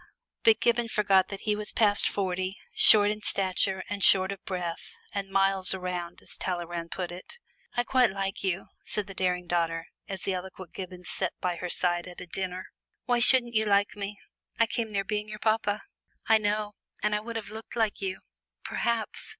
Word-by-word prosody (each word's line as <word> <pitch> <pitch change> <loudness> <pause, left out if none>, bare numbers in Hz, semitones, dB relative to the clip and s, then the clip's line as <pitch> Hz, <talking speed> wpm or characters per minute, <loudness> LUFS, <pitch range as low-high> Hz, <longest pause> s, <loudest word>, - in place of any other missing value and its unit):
But 450 -1 +5
Gibbon 235 0 +2
forgot 195 -4 +3
that 195 -1 -7
he 210 -1 0
was 210 0 -2
past 205 -2 +3
forty, 185 0 -2 0.2
short 205 -1 +7
in 210 0 -5
stature, 190 -1 +1
and 205 -1 -3
short 190 0 +5
of 195 - -8
breath, 175 -2 -4 0.2
and 200 -1 -3
"miles 195 -1 +3
around," 180 -2 -5
as - - -9
Talleyrand 175 -2 -3
put 180 -1 -4
it. 180 - -10 0.4
"I 245 - +3
quite 250 -1 +3
like 195 0 -4
you," 190 0 -2
said 210 - -3
the 195 - -9
daring 180 -1 0
daughter, 165 -1 0 0.2
as 195 -1 -5
the 195 - -1
eloquent 185 -1 -7
Gibbon 180 -1 -7
sat 185 0 -3
by 180 -1 -1
her 180 +1 -4
side 175 0 +3
at 180 - -10
a - - -7
dinner. 185 +1 -5 0.3
"Why 245 +1 +2
shouldn't 240 0 +6
you 220 0 +2
like 200 0 +2
me 205 0 -5 0.4
I 230 - +6
came 225 -1 -3
near 200 -1 0
being 210 +1 -2
your 215 - -6
papa!" 215 -1 0 0.4
"I 220 0 +6
know, 210 0 -1 0.3
and 210 0 +2
would 230 0 -5
I - - 0
have 205 - -12
looked 220 +1 -9
like 220 -4 0
you?" 190 -1 -3 0.4
"Perhaps." 235 - -1
195 Hz, 190 wpm, -28 LUFS, 185-210 Hz, 0.4 s, short